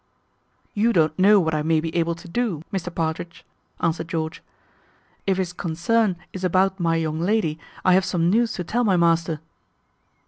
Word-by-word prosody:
"You 225 +3 +2
don't 155 -3 +2
know 205 +2 +6
what 160 -3 0
I 155 - 0
may 160 +1 +2
be 160 +1 -4
able 170 0 +1
to 175 +3 -13
do, 190 -5 -2
Mr 180 -2 -2
Partridge," 165 +1 -3 0.4
answered 165 0 0
George; 160 -1 -3 0.9
"if 190 -1 +2
his 180 -2 -2
concern 180 +5 0 0.2
is 190 - -6
about 190 +2 +2
my 165 -1 +1
young 160 -1 -1
lady, 175 -4 0 0.3
I 185 - +6
have 190 +1 +4
some 175 -3 0
news 230 +5 +2
to 180 - -4
tell 235 +8 0
my 195 -5 +3
master." 165 -2 +2
170 Hz, 175 wpm, -23 LUFS, 165-195 Hz, 0.9 s, know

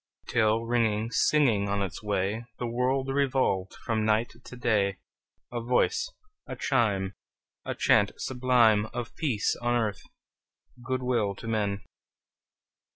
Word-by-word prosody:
Till, 110 -1 +2
ringing, 115 -2 +1
singing 120 -12 +3
on 100 0 0
its 90 -5 -5
way, 105 +2 -1
The 120 - -3
world 130 +3 0
revolved 130 -9 +1
from 110 -3 0
night 110 +2 +1
to - - -10
day, 105 -5 +1 0.5
A 120 -1 -3
voice, 125 - +1 0.4
a - - -5
chime, 105 -7 0 0.5
A - - -3
chant - - +3
sublime 120 -5 +3
Of 120 -2 -4
peace 130 -10 0
on 120 0 +1
earth, 110 -4 -1 0.8
good 130 +1 -2
will 115 -6 0
to 115 - -9
men! 100 -3 -1
115 Hz, 130 wpm, -28 LUFS, 105-125 Hz, 0.8 s, singing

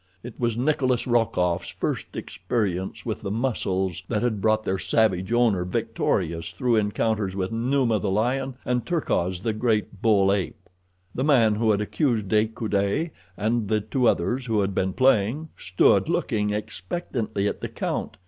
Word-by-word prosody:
It 120 -1 -9
was 120 -2 0
Nikolas 130 -2 +1
Rokoff's 90 -8 +1
first - - -4
experience 95 -6 -3
with - - -3
the - - -4
muscles 95 -6 -1
that 105 0 -1
had 110 -5 0
brought 110 +1 +2
their 95 -2 -1
savage 95 -2 +1
owner 115 -6 +3
victorious 90 -5 -1
through 125 -4 +1
encounters 105 -2 0
with 95 0 -2
Numa, 120 -1 +1
the 100 - -1
lion, 125 +6 0
and 125 -1 0
Terkoz, 95 - -1
the 110 - 0
great 110 -3 -1
bull 100 -3 +4
ape. 100 -2 -4 0.5
The 130 - -2
man 125 -7 +4
who 110 +1 +1
had 105 -1 +3
accused 110 -2 0
De 110 +1 +3
Coude, 110 +7 -1 0.3
and 110 +1 0
the 110 +1 +2
two 120 +4 0
others 120 +10 0
who 110 -2 +2
had 100 0 -1
been 95 0 0
playing, 130 +5 +2
stood 90 -1 +2
looking 105 -1 0
expectantly 105 - -3
at - - -3
the - - -4
count. - - -3
110 Hz, 160 wpm, -25 LUFS, 100-120 Hz, 0.5 s, bull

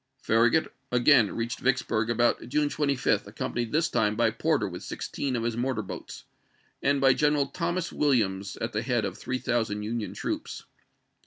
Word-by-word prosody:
Farragut 120 +8 +3 0.2
again 125 -2 +5
reached 115 +1 -3
Vicksburg 125 -4 0
about 120 0 +1
June 150 +2 +1
25, 140 -3 0
accompanied 120 -2 -3
this 165 +2 +2
time 105 -7 +1
by 115 0 +2
Porter 115 - 0
with - - -7
sixteen 135 -3 -4
of 115 - -1
his 115 -1 -1
mortar 120 -2 -1
boats, - - -8 0.6
and 140 0 +2
by 135 -1 +5
General 150 0 +2
Thomas 175 +3 -3
Williams 100 -9 +1
at - - -4
the 105 - 0
head 120 -4 0
of 95 -2 -4
three 130 - -3
thousand 110 -4 -1
Union 110 0 -3
troops. - - -4
120 Hz, 165 wpm, -27 LUFS, 110-140 Hz, 0.6 s, again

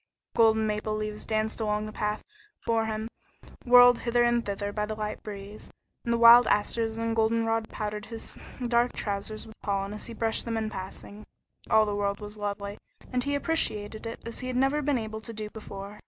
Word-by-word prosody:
Golden 220 -1 +5
maple 215 0 -1
leaves 215 0 -4
danced 220 0 -1
along 210 -1 0
on - - -4
the 215 - -6
path 210 0 -2 0.4
before 225 -1 0
him, 220 0 -3 0.6
whirled 245 0 +8
hither 240 0 +2
and 240 0 +3
thither 205 0 -3
by 210 0 -1
the 215 - -3
light 215 0 -4
breeze, 205 0 -8 0.3
and 235 - -1
the 235 - +3
wild 235 +1 +9
asters 225 +2 +1
and 230 0 -1
goldenrod 225 0 +1
powdered 210 0 -4
his 225 0 -6 0.3
dark 240 0 +2
trousers 205 +1 -3
with 220 -1 -15
pollen 200 -1 -1
as 210 - -7
he 235 - -7
brushed 225 0 +1
them 230 -1 -2
in 220 -1 -2
passing. 200 +2 -8 0.4
All 220 0 +5
the 205 - -2
world 200 0 -1
was 210 0 -8
lovely, 200 0 -4 0.3
and 250 0 +1
he 285 +1 0
appreciated 220 -9 0
it 230 - -6
as 230 - -6
he 255 - -5
had 255 - -3
never 270 +3 +2
been 285 -2 +1
able 220 -1 -5
to 230 - -7
do 215 -1 -6
before. 200 -1 -8
220 Hz, 200 wpm, -28 LUFS, 210-230 Hz, 0.6 s, wild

